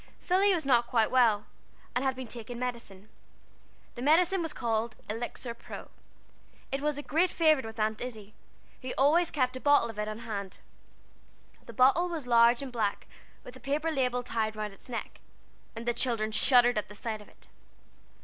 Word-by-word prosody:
Philly 385 +3 +3
was 340 -6 0
not 240 -3 +3
quite 225 -3 +2
well, 225 -5 +3 0.5
and 250 - 0
had 265 -1 0
been 260 0 -6
taking 235 +1 -7
medicine. 235 -5 -6 0.9
The 240 - -8
medicine 345 +7 +3
was 325 -2 -3
called 230 -3 -2
Elixir 235 +2 -4
Pro. 235 - -10 0.8
It 275 +1 -2
was 300 -1 -1
a 290 - -5
great 340 +6 +2
favorite 310 -9 +3
with 225 0 -9
Aunt 215 0 0
Izzie, 215 -4 -7 0.5
who 255 -1 -5 0.4
kept 255 -3 0
a - - -6
bottle 285 -4 +3
of 210 - -11
it 210 - -1
always 215 +1 -6
on - - -11
hand. 200 -3 -5 1.1
The 235 - -9
bottle 275 +10 +4
was 325 -6 -4
large 235 +1 +4
and 265 - -7
black, 215 -4 -2 0.4
with 250 - -11
a - - -12
paper 295 +4 -1
label 250 -4 0
tied 220 -2 -2
round 210 -1 -4
its 195 - -11
neck, 235 -2 -6 0.6
and 230 +1 -7
the 240 - +2
children 230 -3 0
shuddered 245 0 +4
at - - -7
the 210 - -11
sight 215 0 -4
of 210 - -15
it. - - -21
245 Hz, 185 wpm, -29 LUFS, 220-275 Hz, 1.1 s, bottle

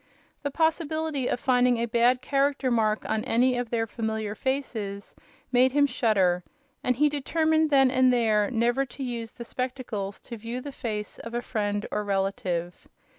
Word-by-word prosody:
The 285 - -2
possibility 315 -2 0
of - - -1
finding 250 -2 +3
a 230 - 0
bad 240 +2 +2
character 275 -1 +1
mark 220 -2 +1
on 220 0 0
any 255 +1 +3
of 245 -1 -2
their 225 -1 0
familiar 220 -2 -3
faces 220 -6 -3 0.4
made 255 +1 +4
him 290 0 +5
shudder, 190 -9 +2 0.4
and 250 - +2
he 300 +5 +4
determined 315 +2 +1
then 270 -3 +5
and 255 -1 +4
there 220 -4 +2
never 240 +3 +1
to 270 +1 -8
use 235 -2 -4
the 235 - -8
spectacles 245 -6 -4
to 235 - -8
view 230 +3 -5
the 285 +3 -7
face 215 -6 -5
of 230 +1 -7
a 240 - 0
friend 205 -2 -2
or 210 - -1
relative. 190 -3 -2
240 Hz, 170 wpm, -27 LUFS, 215-270 Hz, 0.4 s, him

